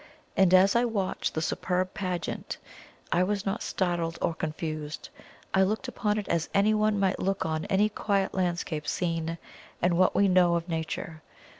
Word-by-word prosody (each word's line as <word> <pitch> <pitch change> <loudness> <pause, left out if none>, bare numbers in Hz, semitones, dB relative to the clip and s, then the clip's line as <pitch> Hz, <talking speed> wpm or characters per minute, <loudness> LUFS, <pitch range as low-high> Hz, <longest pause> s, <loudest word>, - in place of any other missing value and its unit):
And 190 -2 +4
as 190 +2 +6
I 235 - +4
watched 205 -6 -1
the 160 - 0
superb 185 +2 -1
pageant, 185 -4 -3 0.5
I 175 - +3
was 200 +1 0
not 195 +3 -1
startled 175 -3 -1
or 170 - 0
confused 155 -1 -4 0.4
I 190 - +4
looked 215 +7 +1
upon 210 -4 -1
it 210 - -3
as 165 -1 0
anyone 215 +1 +3
might 195 -1 +1
look 195 +1 -1
on 160 -1 -2
any 200 +2 +3
quiet 200 -2 0
landscape 175 -4 -2
scene 165 -1 -1 0.4
in 175 -1 +2
what 185 0 +3
we 200 - +4
know 180 -2 +4
of 170 0 -2
Nature. 160 -1 -4
185 Hz, 165 wpm, -28 LUFS, 165-200 Hz, 0.5 s, as